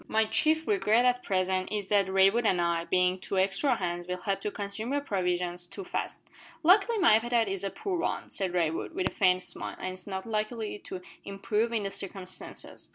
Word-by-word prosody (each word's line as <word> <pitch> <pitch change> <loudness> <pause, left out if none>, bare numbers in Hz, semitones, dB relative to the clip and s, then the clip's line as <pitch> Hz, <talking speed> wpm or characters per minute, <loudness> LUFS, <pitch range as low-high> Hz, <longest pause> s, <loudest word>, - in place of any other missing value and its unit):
"My 220 0 +2
chief 315 +7 +2
regret 245 - +3
at 250 0 +3
present 185 -2 0
is 205 -2 -3
that 200 -2 +3
Raywood 195 +5 +4
and 185 - +2
I, 170 -1 0
being 180 +1 +2
two 195 +1 -3
extra 195 +8 +2
hands, 175 -3 -3
will 180 0 -2
help 195 +2 -2
to - - -2
consume 205 +5 -5
your 285 - +1
provisions 180 -6 -1
too 195 - -8
fast." - - -4 0.4
"Luckily 395 +7 +5
my 355 - +6
appetite 235 -1 +1
is 195 0 -3
a 195 - -1
poor 370 - -3
one," 340 - -2
said 190 -2 -1
Raywood, 165 -3 -1
with 370 - 0
a - - -16
faint 185 -2 +3
smile; - - -5
"and 185 - -4
it's 185 +1 -12
not 190 -1 -4
likely 215 -1 -2
to 185 -1 -7 0.2
improve 210 +3 -1
in 225 -3 0
the 195 - -3
circumstances." 190 -1 -5
195 Hz, 205 wpm, -29 LUFS, 185-230 Hz, 0.4 s, my